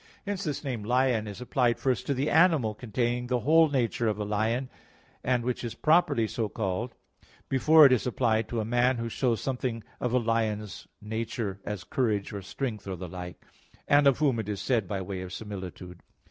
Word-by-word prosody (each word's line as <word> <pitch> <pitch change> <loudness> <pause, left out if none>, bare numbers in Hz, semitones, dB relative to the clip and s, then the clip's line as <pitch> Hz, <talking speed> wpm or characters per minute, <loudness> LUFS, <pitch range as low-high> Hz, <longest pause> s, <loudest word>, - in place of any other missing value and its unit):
Hence 200 -1 -3
this 150 -2 -3
name 125 -7 -3
"lion" 120 -1 +1
is 105 +3 -8
applied 125 -1 +1
first 130 -3 -1
to 140 - +1
the 135 +3 0
animal 160 -9 +4
containing 120 +2 -2
the 125 -1 0
whole 160 +4 +5
nature 120 -4 0
of 105 -2 0
a 105 - -3
lion, 110 +5 0 0.6
and 125 -1 +1
which 125 0 -2
is 120 - -4
properly 155 -8 +3
so 110 -1 -2
called, 110 +4 -3 0.5
before 155 +4 +6
it 135 - +7
is 130 -1 +2
applied 115 -3 +1
to 120 - -2
a 110 - -1
man 120 +2 +2
who 115 0 -3
shows 115 -2 0
something 125 -4 -3 0.2
of 125 - -1
a 125 - +3
lion's 110 -4 -1 0.2
nature, 110 -2 -4
as 105 -4 -4
courage, 105 -1 -1
or 100 - -5
strength, 105 +2 -5
or 95 - -3
the 90 +1 -7
like; 90 +1 -8 0.4
and 145 0 +5
of 135 - +4
whom 140 -6 +2
it 110 - -4
is 100 -2 -3
said 115 -7 0
by 95 -1 -3
way 95 0 -5
of 90 -1 -7
similitude. 95 -3 -7
115 Hz, 200 wpm, -28 LUFS, 105-130 Hz, 0.6 s, it